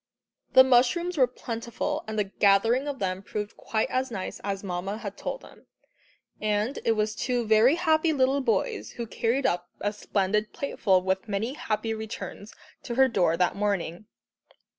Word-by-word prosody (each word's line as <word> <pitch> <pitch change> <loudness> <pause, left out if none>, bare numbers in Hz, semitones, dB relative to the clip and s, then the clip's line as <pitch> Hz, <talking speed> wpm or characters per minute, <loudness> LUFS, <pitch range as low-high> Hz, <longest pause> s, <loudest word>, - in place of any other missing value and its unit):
The 260 - +10
mushrooms 265 +8 +3
were 260 -5 +4
plentiful, 240 +6 -4
and 220 - -4
the 210 - +3
gathering 205 +7 +3
of 285 -2 -3
them 185 -3 -2
proved 210 +1 -5
quite 220 -1 -1
as 260 +1 0
nice 195 -5 -5
as 195 -1 -3
Mamma 190 +2 -3
had 205 -3 -6
told - - -5
them. - - -17 0.7
And 215 +4 0
it 225 - +3
was 215 -1 0
two 245 +1 -1
very 220 +6 +5
happy 320 -2 +2
little 275 -1 +2
boys 435 - -1
who 235 - -5
carried 235 +5 -1
up 175 0 0
a 205 +1 -1
splendid 210 +1 -1
plateful 190 -9 +1
with 190 +2 -1
"many 215 +5 -2
happy 225 -4 -2
returns" 220 -1 -7 0.3
to 235 - -5
her 265 +1 +6
door 180 -8 +2
that 180 0 +1
morning. 200 -2 -2
220 Hz, 165 wpm, -27 LUFS, 200-260 Hz, 0.7 s, The